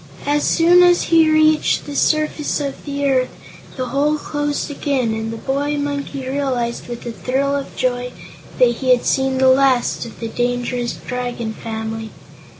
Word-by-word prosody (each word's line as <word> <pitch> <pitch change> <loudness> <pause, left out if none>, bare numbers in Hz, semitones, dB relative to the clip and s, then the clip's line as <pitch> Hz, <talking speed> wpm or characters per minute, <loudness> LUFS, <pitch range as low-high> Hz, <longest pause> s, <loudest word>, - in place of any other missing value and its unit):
As 290 +1 +1
soon 350 +2 +5
as 355 0 +5
he 325 -2 +4
reached 310 0 +3
the 290 - -7
surface 305 0 +1
of 280 -2 -5
the 285 -1 -2
earth 260 -2 +2 0.5
the 255 -1 -3
hole 295 +2 +1
closed 290 0 -3
again, 270 -5 -1
and 220 0 -3
the 230 - -5
boy 285 +4 -1
monkey 285 -2 -3
realized, 260 -4 -2
with 240 0 -7
a 240 - -3
thrill 270 +4 -1
of 280 -1 -5
joy, 250 -1 -1 0.5
that 240 -2 +3
he 260 - -2
had 250 -1 +4
seen 265 -1 +1
the 260 0 +4
last 260 -1 +3
of 230 - -13
the 230 - -4
dangerous 245 +1 -2
Dragon 245 -3 -4
family. 220 0 -5
265 Hz, 165 wpm, -19 LUFS, 245-290 Hz, 0.5 s, soon